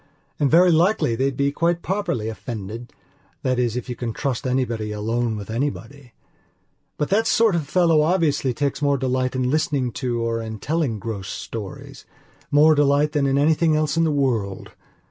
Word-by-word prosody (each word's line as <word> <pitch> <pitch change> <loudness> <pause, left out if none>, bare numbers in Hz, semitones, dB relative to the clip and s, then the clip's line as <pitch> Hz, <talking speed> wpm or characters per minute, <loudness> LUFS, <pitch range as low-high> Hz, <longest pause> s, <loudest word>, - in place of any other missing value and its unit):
And 145 - +2
very 175 +4 +6
likely 170 - +2
they'd 130 +3 -1
be 140 0 +1
quite 170 +3 0
properly 190 - -2
offendedthat 110 +2 -6 0.7
is 120 -2 0
if 125 - -5
you 125 - -4
can 115 -1 -4
trust 135 0 -2
anybody 120 -4 -1
alone 110 +2 -1
with 105 +1 -7
anybody. 135 +1 -4 0.8
But 150 - -1
that 220 +3 +2
sort 225 -3 +3
of 160 -4 -2
fellow 170 -4 +3
obviously 150 -5 +1
takes 140 +3 -2
more 140 -1 +2
delight 130 0 -1
in 130 0 0
listening 140 -4 0
to 120 -2 -1
or 115 0 -1
in 110 -1 -6
telling 145 -2 -1
gross 100 -2 -6
storiesmore 145 +7 -2
delight 145 +1 +3
than 145 -2 +1
in 135 0 +1
anything 155 +2 +3
else 155 0 0
in 165 - +2
the 160 - +2
world. 115 -9 -1
135 Hz, 165 wpm, -22 LUFS, 115-155 Hz, 0.8 s, very